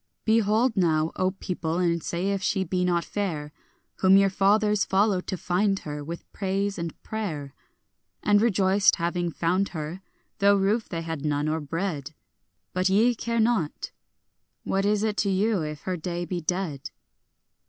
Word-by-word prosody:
Behold 225 +2 +3
now, 160 -4 +2
O 185 - +1
people, 175 -3 -3
and 170 -2 +1
say 175 +5 -2
if 195 -1 -1
she 190 0 0
be 180 +1 -1
not 175 -2 +1
fair, 160 -8 -3 0.5
Whom 190 0 +6
your 195 -1 +4
fathers 210 +1 +3
followed 195 -1 +1
to 185 - -2
find 195 +3 +1
her, 150 -1 -6
with 170 +3 -8
praise 195 0 -1
and 170 -1 -5
prayer, 155 -11 -4 0.7
And 205 0 +4
rejoiced, 195 -3 +4
having 175 +1 -1
found 180 +4 0
her, 160 +2 -6 0.4
though 200 0 +5
roof 205 +4 +1
they 165 -2 -4
had 165 -3 -5
none 145 -1 0
nor 155 +1 0
bread; 155 -1 -4 0.6
But 185 +1 +1
ye 220 +6 +4
care 235 0 -2
not; 220 -9 0 0.7
what 195 +1 0
is 210 0 +2
it 215 -1 -1
to 200 - +1
you 195 0 +1
if 150 -2 -5
her 185 -1 -3
day 175 +1 -4
be 175 0 -3
dead? 165 -4 -3
185 Hz, 165 wpm, -26 LUFS, 165-200 Hz, 0.7 s, Whom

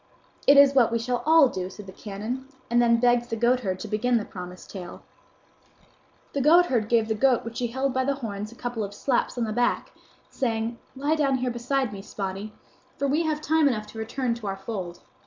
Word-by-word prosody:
"It 280 - +8
is 280 -1 +8
what 250 -4 +4
we 230 - +1
shall 245 +1 -2
all 320 -3 +7
do," 185 -5 -4
said 205 +2 -11
the 190 - -9
canon; 215 +7 -6 0.2
and 240 0 +4
then 235 -1 +4
begged 240 0 +3
the 225 - -1
goatherd 235 -5 +1
to - - -5
begin 235 +4 +1
the 215 - -2
promised 180 -1 -9
tale. 180 -3 -8 1.3
The 280 - 0
goatherd 290 -7 +4
gave 230 -2 +3
the 220 - +1
goat 245 +2 +2
which 230 0 -5
he 245 - 0
held 265 +3 -1
by 260 0 +1
the 275 +1 0
horns 215 -5 -5
a - - -13
couple 245 -2 -3
of 200 0 -6
slaps 250 +3 0
on 240 - 0
the 215 -1 -2
back, 245 +2 0 0.4
saying, 230 -2 -2 0.2
"Lie 285 +3 0
down 275 -3 +2
here 250 0 -1
beside 245 0 -1
me, 195 - -7
Spotty, 195 +1 -5 0.5
for 280 - 0
we 305 +4 +1
have 305 -1 -1
time 315 0 +3
enough 215 -6 -1
to 225 - -9
return 240 +2 -1
to 230 -3 -7
our 195 0 -3
fold." 190 -4 -6
235 Hz, 215 wpm, -26 LUFS, 215-265 Hz, 1.3 s, It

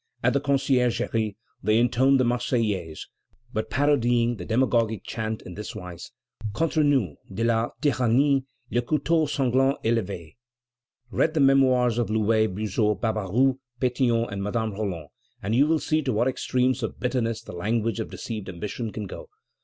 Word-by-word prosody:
At - - +3
the 140 - +1
Conciergerie 125 -6 +1 0.3
they 110 +2 +3
intoned 125 +3 +4
the - - +4
Marseillaise, 115 -9 -1 0.5
but 110 - -2
parodying 120 -4 +2
the 90 - -7
demagogic 115 -2 +1
chant 110 -1 -4
in 90 - -9
this 105 +3 -7
wise: 90 -4 -8 0.4
Contre 160 +3 +1
nous 130 - +1
de 110 +4 -2
la 115 0 +2
tyrannie 135 0 +3 0.3
Le 120 - +2
couteau 155 +4 +1
sanglant 135 -1 +2
est 115 - +3
levé. 95 -5 -5 0.7
Read 160 0 +1
the - - +2
Memoirs 130 -4 +4
of 115 -4 0
Louvet, 110 0 +2
Buzot, 105 +1 0
Barbaroux, 115 +4 +1 0.2
Pétion, 120 -2 +1
and 100 0 -4
Madame 110 +2 -1
Roland, 95 -7 -4 0.3
and 100 +3 -1
you 135 +5 +4
will 160 +1 +3
see 155 0 0
to 135 - -1
what 115 +3 +1
extremes 130 0 0
of 115 - -4
bitterness 115 -3 -1
the - - -9
language 115 +5 -1
of 110 - -3
deceived 105 -4 -6
ambition 105 +5 -5
can 105 -1 -5
go. 95 - -9
115 Hz, 160 wpm, -25 LUFS, 110-130 Hz, 0.7 s, intoned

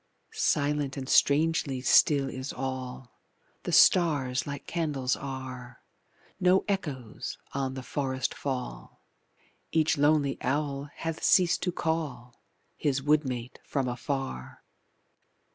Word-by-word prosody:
Silent 145 - 0
and 130 -1 -5
strangely 145 -2 +3
still 135 +2 +4
is 130 +1 -5
all; 130 -2 -6 0.4
The - - -4
stars 140 -7 +4
like 140 -1 -6
candles 145 -6 -1
are, 130 -2 -7 0.6
No 185 0 +4
echoes 145 - -4 0.2
on 135 -1 -2
the 130 - -6
forest 130 -1 -2
fall, 125 - -5 0.7
Each 160 -2 +2
lonely 145 -1 +3
owl 140 +1 -1
hath 165 -1 -5
ceas'd 180 -1 +4
to 180 - 0
call 150 -8 -3 0.4
His 140 -3 0
wood 150 +1 +3
mate 125 -1 -5
from 135 -3 -1
afar. 125 - -4
140 Hz, 110 wpm, -28 LUFS, 130-150 Hz, 0.7 s, still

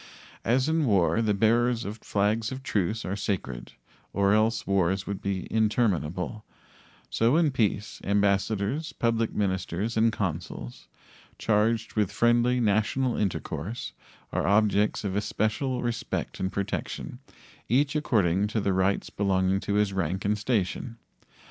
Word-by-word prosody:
As 130 +4 +2
in 160 -1 +2
war 100 -1 +3
the 105 -2 +1
bearers 115 +2 +2
of 105 +3 -6
flags 105 +4 0
of 130 0 -6
truce 110 -1 -1
are 95 - -2
sacred, 90 - -4 0.4
or 100 +1 +3
else 110 +1 +2
wars 95 0 +1
would 100 -1 -4
be 95 -2 -2
interminable, 105 -3 0 0.7
so 115 - +3
in 165 -4 +3
peace 105 -4 -1
ambassadors, 100 +7 0
public 115 -1 0
ministers, 95 +2 -1
and 115 +1 +4
consuls, 85 - -5 0.5
charged 110 +1 +1
with 105 -4 +1
friendly 120 +1 +3
national 115 +4 +1
intercourse, 95 - -3 0.4
are - - 0
objects 105 +1 +2
of 100 -2 -2
especial 110 +5 -1
respect 120 -2 -3
and 95 0 -1
protection, 100 0 -4 0.5
each 140 +5 +2
according 105 - +2
to 110 +1 -1
the 100 -2 0
rights 95 +1 0
belonging 95 -1 +1
to 100 - -2
his 105 -1 +2
rank 95 +1 -2
and 105 +1 +1
station. 115 +1 -1
105 Hz, 135 wpm, -27 LUFS, 95-115 Hz, 0.7 s, and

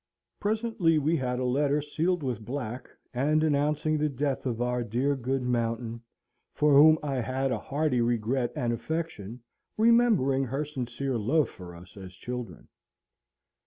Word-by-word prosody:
Presently 215 -6 +1
we 155 +3 +2
had 125 -2 -2
a 130 - -1
letter 140 +3 +2
sealed 160 +3 -1
with 120 -5 -3
black, 125 0 -5 0.2
and 150 +5 +2
announcing 150 +1 +1
the 150 0 +1
death 140 0 -2
of 120 -2 -2
our 125 0 0
dear 125 +6 0
good 130 0 -2
Mountain, 115 -1 -2 0.5
for 150 -1 +3
whom 155 +3 +8
I 140 -3 -2
had 130 +2 -1
a 115 - -1
hearty 140 -2 0
regret 120 +1 0
and 120 -1 -1
affection, 120 - -5 0.3
remembering 215 - +4
her 135 +5 -2
sincere 130 -2 -3
love 140 +8 +2
for 90 -2 -11
us 85 +1 -14
as 95 -2 -9
children. 125 +4 -7
135 Hz, 150 wpm, -28 LUFS, 120-150 Hz, 0.5 s, whom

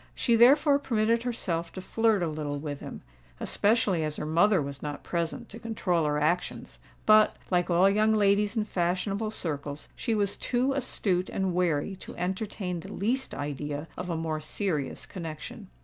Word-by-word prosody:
She 235 - +2
therefore 280 +5 +6
permitted 230 -3 +1
herself 175 -9 -2
to - - -6
flirt 220 0 +1
a - - +1
little 150 -2 -3
with 145 -1 -5
him; - - -8 0.4
especially 205 -6 +2
as 155 -1 -2
her - - -4
mother 175 +6 +4
was 140 -2 -4
not 145 -1 -5
present 170 +8 -3
to 225 - -9
control 190 -8 0
her 150 0 +1
actions; 170 +4 -1 0.3
but, 215 0 +6
like 175 0 +2
all 175 +2 +5
young 215 +2 +3
ladies 205 +1 +3
in 215 - +2
fashionable 195 +3 -1
circles, 145 -7 -5
she 230 -3 -1
was 200 -2 0
too 255 +2 0
astute 190 -8 0
and 190 -2 -1
wary 175 0 0
to - - -10
entertain 185 0 -3
the - - -9
least 245 +7 -1
idea 145 +1 -4
of 180 0 -5
a 165 - -1
more 160 -1 -2
serious 155 -3 -2
connexion. 160 -4 -7
185 Hz, 170 wpm, -28 LUFS, 160-215 Hz, 0.4 s, therefore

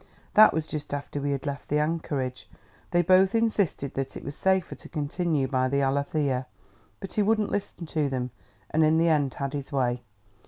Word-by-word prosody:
That 215 +1 +8
was 160 -1 -1
just 150 -2 -4
after 145 0 -5
we 145 - -1
had 140 0 -2
left 140 -1 -4
the 150 - +2
anchorage. 150 -5 -2 0.4
They 175 0 +3
both 185 +4 +5
insisted 205 - +1
that 135 -1 -3
it - - -9
was 140 - -5
safer 190 -1 +1
to - - -10
continue 150 -1 -1
by 130 -1 +1
the 140 +1 +1
Alethea, 135 -1 0 0.5
but 195 - -7
he 215 - +2
wouldn't 215 0 +2
listen 200 -4 -3
to 155 -2 -1
them, 125 -2 -3 0.4
and 160 +1 +3
in 155 +1 +4
the 165 +1 +4
end 145 -4 +1
had 140 0 -3
his 140 -2 -5
way. 125 -3 0
150 Hz, 195 wpm, -27 LUFS, 135-175 Hz, 0.5 s, That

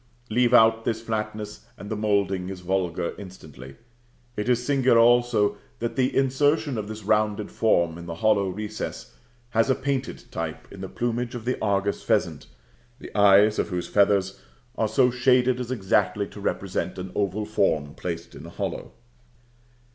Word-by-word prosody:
Leave 120 +1 +3
out 115 -2 +5
this 115 -1 -1
flatness, 105 -2 -5
and 100 - -9
the - - -1
moulding 100 -3 0
is 95 -2 -7
vulgar 90 -2 -1
instantly. 75 -9 -11 0.6
It 105 +3 -2
is 125 0 +1
singular 130 -4 +3
also 115 -3 +4 0.2
that 115 0 -3
the 130 -1 +1
insertion 145 +2 +2
of 105 - -5
this 110 0 -7
rounded 105 0 0
form 85 -7 +1
in 85 - -9
the 85 - -5
hollow 100 +1 +2
recess 105 +3 -6 0.4
has 115 +3 +2
a 130 - +4
painted 135 -1 -3
type - - -5
in - - -10
the - - -6
plumage 120 +1 -2
of 115 -2 -7
the 125 - 0
Argus 100 -1 0
pheasant, - - 0 0.5
the - - -12
eyes 105 +1 +5
of - - 0
whose 90 -2 -3
feathers 100 -3 +2 0.4
are 110 - +1
so 125 +4 +3
shaded 125 0 +3
as 125 -1 -4
exactly 110 -7 +1
to - - -11
represent - - -2
an 90 0 -6
oval 100 +1 -1
form 75 -9 0
placed 85 -1 -6
in - - -11
a - - -9
hollow. - - -5
105 Hz, 165 wpm, -25 LUFS, 95-120 Hz, 0.6 s, out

